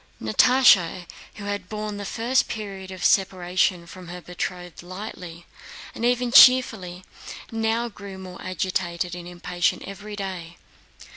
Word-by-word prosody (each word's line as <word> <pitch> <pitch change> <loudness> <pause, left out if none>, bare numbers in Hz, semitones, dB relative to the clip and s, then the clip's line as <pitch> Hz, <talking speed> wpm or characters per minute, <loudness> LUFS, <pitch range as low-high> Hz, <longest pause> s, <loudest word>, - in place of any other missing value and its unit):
Natásha, 185 - +4 0.3
who 205 - -9
had 205 -2 -4
borne 210 -1 -4
the 205 - -6
first 240 +6 +1
period 195 -3 -6
of 185 -1 -5
separation 180 -2 +2
from 180 +1 -11
her 175 +1 -7
betrothed 180 0 -6
lightly 180 -2 -9 0.5
and - - -7
even 245 0 +1
cheerfully, 220 -9 +6 0.5
now 225 +1 0
grew 200 -3 -10
more 185 -1 -10
agitated 180 -1 -2
and 175 0 -7
impatient 175 0 -1
every 205 +2 -8
day. 185 -4 -6
190 Hz, 130 wpm, -24 LUFS, 180-215 Hz, 0.5 s, cheerfully